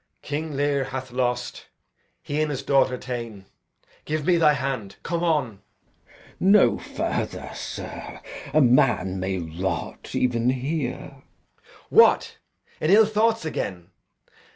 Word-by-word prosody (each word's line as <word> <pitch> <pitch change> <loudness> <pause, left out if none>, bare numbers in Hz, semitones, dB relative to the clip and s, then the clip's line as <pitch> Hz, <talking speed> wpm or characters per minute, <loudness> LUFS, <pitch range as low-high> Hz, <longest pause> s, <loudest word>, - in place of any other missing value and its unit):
King 150 +1 -4
Lear 140 -1 +1
hath 130 -1 -6
lost, 125 0 -2 0.6
he 145 +1 -2
and 155 - 0
his 140 -3 -3
daughter 135 -2 +2
ta'en. 115 -6 -6 0.6
Give 155 -1 -3
me 180 -2 +4
thy 155 -3 +5
hand! 130 -8 -3
come 170 0 -2
on! 145 - 0 0.5
Glou. - - -25 0.3
No 195 +2 +5
further, - - -3
sir. - - -7 0.3
A 155 +2 +4
man 120 -7 +3
may 95 +1 -2
rot 85 +2 -4
even 120 -1 +1
here. 130 +2 -3
Edg. - - -23 0.7
What, - - +5 0.4
in 155 - 0
ill 215 +3 +7
thoughts 220 -1 +1
again? 90 - -4
130 Hz, 130 wpm, -24 LUFS, 115-155 Hz, 0.7 s, ill